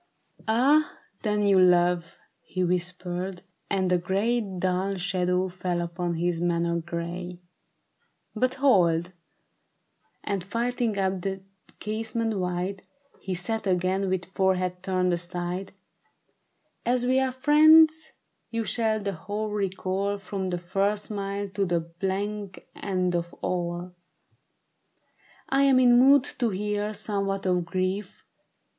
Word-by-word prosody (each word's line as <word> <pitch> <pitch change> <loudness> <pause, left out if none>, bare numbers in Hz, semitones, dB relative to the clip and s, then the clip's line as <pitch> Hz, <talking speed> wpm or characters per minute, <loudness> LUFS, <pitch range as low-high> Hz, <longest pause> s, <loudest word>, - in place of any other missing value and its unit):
"Ah 275 +7 +3 0.2
then, 210 -1 0
you 195 -2 +5
love," 175 -1 +3 0.2
he 185 - -3
whispered; 180 +1 -2 0.3
and 190 -2 +1
a 180 - +3
gray 210 +7 +1
Dull 190 -1 -1
shadow 180 0 0
fell 180 -1 -3
upon 170 0 -2
his 170 0 -1
manner 170 -1 +1
gay. 175 +1 -5 0.5
" - - -46
But 255 0 +2
hold! 180 -11 +3 0.6
" - - -45
and 200 -3 -2
flinging 235 +1 -1
up 190 -1 0
the 195 +1 -4 0.4
casement 220 0 -2
wide, 180 +2 -2 0.4
He 190 -2 -4
sat 210 +5 -2
again 185 +1 +1
with 185 -1 -1
forehead 185 -1 0
turned 185 -1 +1
aside; 175 +2 -4 0.6
'' - - -48 0.3
As 245 0 +1
we 260 +1 +3
are 265 -1 +1
friends, 310 +4 +5 0.4
you 230 -1 -2
shall 220 -2 +1
the 200 -1 -3
whole 205 +5 -4
recall 195 0 -1
From 195 -1 -4
her 175 - -1
first 195 +4 -1
smile 200 -1 -3
to 195 +1 -1
the 175 -3 +1
blank 190 +4 -4
end 185 -2 -1
of 170 0 -2
all. 175 0 -2 1.6
I 270 +1 +3
am 270 -2 +5
in 245 -1 +6
mood 275 +1 +6 0.2
to 240 -3 +2
hear 210 +1 -2
somewhat 195 -2 -2
of 180 -2 +1
grief. 185 +2 -3
190 Hz, 130 wpm, -26 LUFS, 180-210 Hz, 1.6 s, in